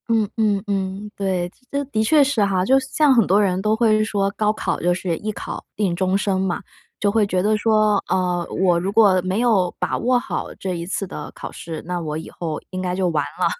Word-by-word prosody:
嗯 220 -3 +2
嗯 210 -3 +2
嗯， 195 +1 -3
对， 185 -3 -1 0.2
这 280 0 -1
的 220 -5 -1
确 290 +6 +5
是 270 -6 +1
哈。 190 -2 +1
就 265 +5 +5
像 270 +2 +2
很 230 -5 +4
多 200 +3 +4
人 190 -2 +1
都 215 +2 +2
会 220 -2 +3
说， 200 -2 0
高 210 +1 +1
考 215 - -2
就 175 +1 +2
是 175 -1 -2
一 215 - -3
考 - - -6
定 195 -5 0
终 185 +1 +1
生 195 -2 0
嘛。 190 -1 -1 0.4
就 205 - +2
会 220 0 +3
觉 185 -2 0
得 215 +2 +2
说， 215 -2 +2
嗯， 180 -2 0 0.2
我 175 -2 +4
如 190 +3 -2
果 205 -3 +5
没 185 +3 -1
有 210 -7 +2
把 - - -1
握 250 +1 +2
好 - - -4
这 185 -2 -3
一 170 0 -4
次 195 +2 -3
的 - - -7
考 - - -8
试， 165 -2 -7
那 180 -1 -2
我 155 -3 -4
以 160 - -6
后 160 -3 -5
应 185 - -5
该 180 -1 -2
就 185 -1 +1
完 155 -3 0 0.2
了。 - - +3
195 Hz, 245 characters per minute, -21 LUFS, 180-215 Hz, 0.4 s, 确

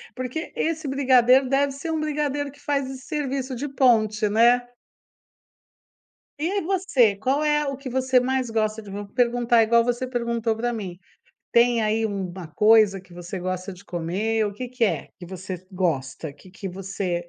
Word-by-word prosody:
porque 255 +5 -5
esse 320 -2 -1
brigadeiro 260 -1 +4
deve 275 +1 +2
ser 280 +4 -5
um 320 - -1
brigadeiro 290 -2 -1
que 285 - -20
faz 280 -2 -1
esse 265 -1 -8
serviço 270 -3 -3
de 275 +5 -4
ponte, 220 -6 +2
né? 235 +3 +5 1.8
E 320 +5 -1
aí 400 0 0
você, 320 - +2
qual 265 +8 0
é 295 0 +2
o 275 -1 -3
que 275 -1 -7
você 260 0 +2
mais 255 -1 -1
gosta 220 -1 -1
do 205 -2 -11
vou 205 +1 -6
perguntar 240 +1 +3
igual 230 +1 +4
você 245 +1 -1
perguntou 235 -2 -1
para 240 +2 -2
mim, 190 -5 -6 0.5
tem 235 -1 +4
aí 220 +1 +1
um 200 -3 -3
uma 175 -1 -8
coisa 215 -2 +4
que 185 -1 -20
você 175 +2 -6
gosta 185 +1 -4
de 185 +2 -14
comer, 200 +6 -1
o 205 - -4
que 250 +4 -6
que 250 -1 0
é - - -1
que 175 - -9
você 185 0 -7
gosta? 155 -5 -2
Que 185 +6 -17
que 195 +1 -8
você 185 -2 -4
235 Hz, 180 wpm, -24 LUFS, 195-265 Hz, 1.8 s, né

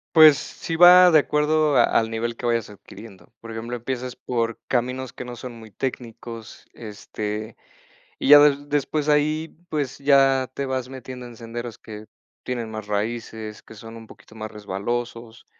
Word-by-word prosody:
Pues 155 -3 +9
sí, 165 - -6
va 180 +1 +9
de 155 - +7
acuerdo 150 0 +1
a - - +6
al 110 -1 +1
nivel 115 +1 -3
que 120 - -8
vayas 115 -2 0
adquiriendo. 105 +2 -14
Por 115 - -10
ejemplo, 115 +2 -5
empiezas 125 +1 -5
por 115 -2 -2
caminos 125 +1 -2
que 125 - -8
no 120 0 -7
son 125 +1 -8
muy 110 -1 -12
técnicos, 115 -1 -7
este, 105 0 -6 0.6
y - - -1
ya 145 0 +11
des 145 0 +3
después 145 +1 -1
ahí, 155 +2 0
pues, 145 -4 -3
ya 135 -2 +3
te 140 - -3
vas 130 -1 -3
metiendo 130 -1 -9
en 120 -1 -11
senderos 115 0 -7
que 105 -1 -10 0.4
tienen 120 -3 -4
más 110 -1 -7
raíces, 110 +1 -4
que - - -14
son 115 +1 -11
un 115 -1 -12
poquito 110 - -17
más 110 -1 -7
resbalosos. 115 +3 -5
120 Hz, 170 wpm, -23 LUFS, 110-140 Hz, 0.6 s, ya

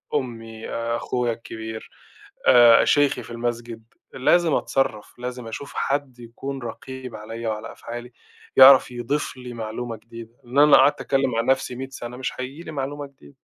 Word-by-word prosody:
أمّي، 115 -3 -4
آآ، 115 0 -2
أخويا 120 -1 -1
الكبير، 110 -1 -8 0.6
آآ، 120 -2 +8
شيخي 145 -1 +2
في - - -12
المسجد 120 -1 -4 0.3
لازم 165 +5 +3
أتصرّف، 110 -8 -1
لازم 125 -1 -6
أشوف 140 +5 -7
حَد 135 -3 -2
يكون 130 +3 -7
رقيب 125 +1 -7
عليَّ 115 +2 -6
وعلى 110 0 -4
أفعالي، 120 +1 -8 0.4
يعرف 130 -1 +8
يضيف 125 +3 -3
لي 125 -1 -8
معلومة 115 +1 -5
جديدة، 115 +1 -12
لإن 125 +4 -1
أنا 150 0 +6
لو - - +10
قعدت 140 +2 +4
أتكلم 135 -2 +1
مع 115 - +1
نَفْسي 130 0 0
مِية 135 +2 -6
سَنة 125 -2 -8
مش 130 - -3
هييجي 135 +6 -7
لي 160 - -8
معلومة 145 0 -4
جديدة. 75 - -19
120 Hz, 165 wpm, -23 LUFS, 115-135 Hz, 0.6 s, لو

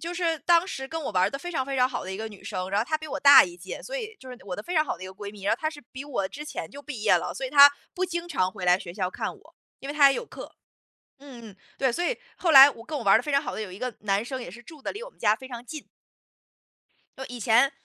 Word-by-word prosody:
就 335 +1 -5
是 335 -2 -1
当 340 +3 +3
时 265 -8 -6
跟 325 +2 -4
我 - - -3
玩 185 - +2
儿 200 - 0
得 275 - -5
非 350 +5 -7
常 265 -5 -1
非 275 0 -4
常 250 0 +3
好 - - -5
的 190 - -6
一 - - -5
个 220 +2 -5
女 205 -3 -14
生， 190 -2 -4
然 200 +1 +1
后 - - 0
她 310 - 0
比 310 - -8
我 - - -5
大 280 -1 +9
一 175 -1 -9
届， 170 - -8
所 - - -6
以 445 -2 -6
就 260 - -13
是 250 - -8
我 185 -2 -5
的 210 - -6
非 355 - -5
常 310 - +3
好 - - -4
的 185 - -9
一 - - -6
个 190 - -9
闺 200 +1 -8
蜜。 205 -1 -14
然 200 - +2
后 - - -15
她 310 - -1
是 305 -2 -11
比 265 +2 -7
我 255 -9 -2
之 295 +8 -8
前 300 - -6
就 285 +1 -11
毕 275 -7 -7
业 215 - +4
了， - - -3
所 270 - -5
以 - - -8
她 285 0 +9 0.2
不 370 - -1
经 345 -1 -4
常 185 - 0
回 185 0 -7
来 180 0 +4
学 180 -3 -9
校 185 -1 -2
看 - - -5
我， - - -22 0.2
因 270 - -9
为 290 - -4
她 285 -2 +7
也 270 - -1
有 480 - -5
课。 - - -9 0.7
嗯 245 -6 -12
嗯， - - -21 0.2
对， 265 - +2
所 345 - -2
以， - - -1 0.2
后 345 - 0
来 275 -1 +11
我 230 -5 -11
跟 300 +4 -5
我 260 - -5
玩 195 -2 +5
儿 - - +7
得 235 - -3
非 295 - -3
常 275 - +3
好 - - -5
的 - - -4
有 205 -4 -6
一 185 - -10
个 255 -2 -3
男 200 +1 0
生 260 0 -5
也 175 - -8
是 235 +5 -12
住 300 +3 -14
得 - - -4
离 420 - -8
我 - - -8
们 - - -31
家 210 -2 +3
非 260 +3 -11
常 240 -2 -8
近。 305 +3 -8 1.3
呃， 265 - -6
以 245 -1 -9
前 230 +5 +4
265 Hz, 360 characters per minute, -26 LUFS, 210-305 Hz, 1.3 s, 来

